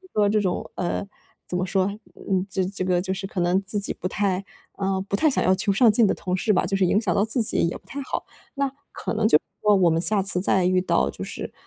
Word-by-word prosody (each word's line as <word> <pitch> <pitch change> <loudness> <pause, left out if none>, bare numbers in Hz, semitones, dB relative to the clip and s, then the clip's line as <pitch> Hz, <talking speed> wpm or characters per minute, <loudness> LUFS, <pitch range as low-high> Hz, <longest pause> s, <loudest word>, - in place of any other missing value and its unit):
说 210 -1 +3
这 215 0 +2
种， 185 -3 -2
呃， 180 +2 -2 0.4
怎 180 - -3
么 185 - -1
说？ 190 0 +1 0.4
嗯， 190 -1 0
这 190 0 -1
这 190 +1 -4
个 180 -1 +1
就 190 0 -2
是 195 +1 -4
可 190 -2 -4
能 175 +2 +2
自 205 +2 -1
己 200 - -1
不 185 - -4
太， 195 -1 0 0.4
呃， 195 -1 0
不 - - -2
太 310 +10 +3
想 270 - +1
要 185 +1 +4
求 200 - 0
上 215 +2 +5
进 225 0 +4
的 - - +1
同 180 0 -3
事 205 +2 +1
吧， - - +2
就 195 - -2
是 190 -2 +3
影 205 - +3
响 205 -6 0
到 200 - +3
自 225 +2 0
己 - - -1
也 - - -4
不 - - -15
太 280 - -6
好。 270 - -4 0.3
那 275 -1 -1 0.2
可 - - -4
能 215 0 +2
就 150 - +6
是 - - +1 0.2
说 210 -1 +5
我 180 -3 +4
们 160 - +1
下 200 +2 +2
次 185 -2 0
再 190 -1 +2
遇 185 0 +3
到 70 - +1
就 - - -8
是 - - -6
195 Hz, 295 characters per minute, -24 LUFS, 185-210 Hz, 0.4 s, 就